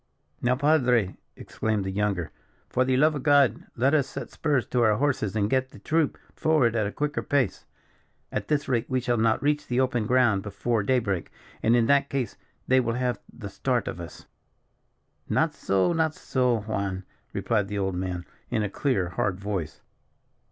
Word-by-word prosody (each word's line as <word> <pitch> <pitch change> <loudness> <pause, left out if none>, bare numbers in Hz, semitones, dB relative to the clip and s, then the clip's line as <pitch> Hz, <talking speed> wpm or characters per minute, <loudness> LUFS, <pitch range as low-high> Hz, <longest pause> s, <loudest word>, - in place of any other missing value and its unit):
"Now, 125 +1 +2
Padre," 125 -8 +2 0.2
exclaimed 110 -3 -2
the 95 - -2
younger, 100 -5 -1 0.4
"for 130 - +3
the 130 0 +1
love 155 +3 +4
of 145 - -4
God, 140 -2 +3
let 135 +5 +3
us 145 -4 +3
set - - -7
spurs 145 -6 0
to 125 - +1
our 110 -2 +4
horses 120 -6 0
and 105 -2 +2
get 130 +3 +1
the - - -14
troop 160 -2 0 0.2
forward 145 -8 +2
at 110 -2 +1
a - - -4
quicker 150 +4 -2
pace. 130 -9 0 0.7
At - - -3
this 150 -1 0
rate, 120 -3 0
we 130 -1 +1
shall 120 -1 0
not 110 +2 +2
reach 150 +1 +1
the 125 +1 0
open 120 -4 +1
ground 120 -5 +3
before 105 +3 -1
day 130 +6 +2
break; 100 -8 -2 0.3
and, 115 +2 +4
in 120 -1 +4
that 140 +2 +3
case, 135 -4 -2 0.3
they 130 0 +5
will 115 -2 0
have 125 -1 -1
the - - -8
start - - -1
of - - -4
us." - - -10 1.0
"Not - - +2
so, 95 - +1
not 160 -2 +1
so, 125 -4 0
Juan," 100 -3 -3 0.3
replied 105 -4 0
the 105 +1 -4
old 95 -1 -1
man, 90 -1 -3 0.2
in 110 - 0
a 100 - -3
clear, 100 -11 0
hard 90 +1 -1
voice. 100 -6 -4
120 Hz, 185 wpm, -26 LUFS, 105-135 Hz, 1.0 s, they